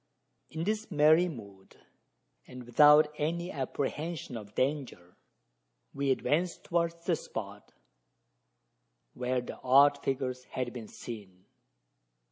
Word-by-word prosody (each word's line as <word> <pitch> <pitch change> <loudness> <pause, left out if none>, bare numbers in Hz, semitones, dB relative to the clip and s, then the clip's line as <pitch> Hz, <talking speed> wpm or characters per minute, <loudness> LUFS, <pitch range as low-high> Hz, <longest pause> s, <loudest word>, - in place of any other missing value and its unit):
In 160 +1 -4
this 215 +3 -2
merry 155 +2 +4
mood, 100 - -12 0.7
and 125 0 -9
without 150 +5 +6
any 170 +4 -2
apprehension 145 +2 -4
of 105 -2 -9
danger, 130 -11 -2 0.8
we 140 0 -1
advanced 165 +6 0
towards 170 0 -1
the 175 - +2
spot 105 -7 -8 1.4
where 125 0 -1
the 125 - -9
odd 140 +2 +5
figures 130 -2 -2
had 125 -2 -4
been 115 -3 -7
seen. 100 -7 -10
135 Hz, 105 wpm, -30 LUFS, 120-160 Hz, 1.4 s, without